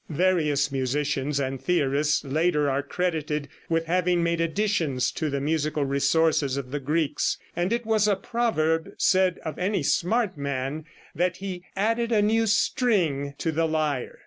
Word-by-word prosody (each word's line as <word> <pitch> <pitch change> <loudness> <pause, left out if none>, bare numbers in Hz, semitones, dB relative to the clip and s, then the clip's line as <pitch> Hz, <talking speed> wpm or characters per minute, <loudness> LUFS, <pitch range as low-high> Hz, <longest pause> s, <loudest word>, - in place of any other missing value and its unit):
Various 150 -4 +1
musicians 140 +1 -1
and 135 -1 -3
theorists 150 -4 +1
later 150 +1 +1
are 135 +1 0
credited 150 -2 -2 0.2
with 165 0 +1
having 175 0 +1
made 170 0 0
additions 165 -7 0
to 155 - -2
the 140 0 -1
musical 150 0 0
resources 140 0 +2
of 130 -2 -5
the 145 - -2
Greeks, 150 +2 0 0.2
and 175 +3 -1
it 235 0 -1
was 215 -1 +2
a 205 - +3
proverb, 185 -7 0
said 185 -1 +3
of 160 - -5
any 185 -2 0
smart 200 - +1
man, 140 +2 -3 0.3
that 180 +1 0
he 185 -2 -6
"added 230 +4 0
a 220 - +4
new 225 +2 +2
string 180 - +1
to 165 - -1
the 165 +1 +1
lyre." 155 -5 -1
160 Hz, 155 wpm, -25 LUFS, 140-185 Hz, 0.3 s, a